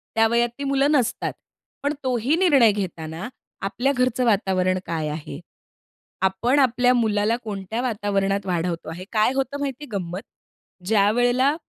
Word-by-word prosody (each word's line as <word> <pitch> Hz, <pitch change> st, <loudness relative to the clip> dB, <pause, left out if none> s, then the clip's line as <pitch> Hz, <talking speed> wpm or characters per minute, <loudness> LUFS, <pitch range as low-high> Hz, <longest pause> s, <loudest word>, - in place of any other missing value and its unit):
त्या 225 Hz, 0 st, +5 dB
वयात 235 Hz, +1 st, +2 dB
ती 280 Hz, -, -5 dB
मुलं 275 Hz, +1 st, +2 dB
नसतात, 250 Hz, -6 st, 0 dB, 0.5 s
पण 285 Hz, -, +1 dB
तोही 255 Hz, +3 st, +1 dB
निर्णय 275 Hz, -, +5 dB
घेताना 170 Hz, -2 st, -5 dB, 0.4 s
आपल्या 245 Hz, +7 st, 0 dB
घरचं 250 Hz, -1 st, +1 dB
वातावरण 190 Hz, -4 st, +2 dB
काय 160 Hz, -2 st, -2 dB
आहे, 150 Hz, -1 st, -6 dB, 0.8 s
आपण 215 Hz, +9 st, +2 dB
आपल्या 250 Hz, -1 st, +3 dB
मुलाला 220 Hz, -1 st, +1 dB
कोणत्या 210 Hz, +1 st, -4 dB
वातावरणात 200 Hz, -4 st, -1 dB
वाढवतो 170 Hz, -2 st, -2 dB
आहे 175 Hz, +3 st, -7 dB
काय 220 Hz, +3 st, +2 dB
होतं 270 Hz, +1 st, -2 dB
माहिती 280 Hz, 0 st, -4 dB
गंमत, 180 Hz, -1 st, -3 dB, 0.7 s
ज्यावेळेला 245 Hz, +7 st, +3 dB
225 Hz, 135 wpm, -23 LUFS, 190-255 Hz, 0.8 s, त्या